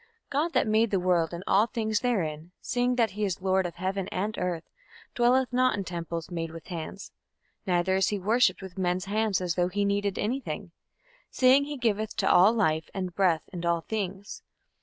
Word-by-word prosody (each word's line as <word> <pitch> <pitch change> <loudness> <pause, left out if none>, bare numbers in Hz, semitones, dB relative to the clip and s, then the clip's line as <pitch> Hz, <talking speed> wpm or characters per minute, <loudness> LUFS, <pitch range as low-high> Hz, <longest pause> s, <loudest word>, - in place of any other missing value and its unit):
God 305 +5 0
that - - +3
made 220 +1 +2
the 195 - +1
world 175 -3 +1
and 170 +1 -6
all 205 +4 +4
things 220 -3 -1
therein, 165 -10 -2
seeing 245 0 0
that 230 -4 +2
he 210 +2 -4
is 195 -2 -1
Lord 190 -1 +1
of 170 - -10
heaven 190 +1 -2
and 205 +3 -2
earth, 175 -3 -2 0.5
dwelleth 250 +1 +2
not 255 -2 +3
in 200 - -2
temples 170 -1 -5
made 165 -1 -3
with 165 0 -10
hands; 175 +3 -6 0.6
neither 185 +1 +2
is 190 - +2
worshipped 205 0 +2
with 190 0 -8
men's 180 0 0
hands 210 -1 0
as 180 -2 -1
though 175 +1 +1
he 200 +2 0
needed 200 -1 0
any 240 +6 -1
thing, 175 - -6 0.6
seeing 265 +2 +4
he 295 0 -5
giveth 220 -3 -1
to 195 - 0
all 185 +4 +6
life, 160 -9 0
and 185 -2 -3
breath, 175 -4 +2
and 175 -1 -5
all 170 -1 +1
things 200 0 -5
195 Hz, 195 wpm, -27 LUFS, 175-220 Hz, 0.6 s, all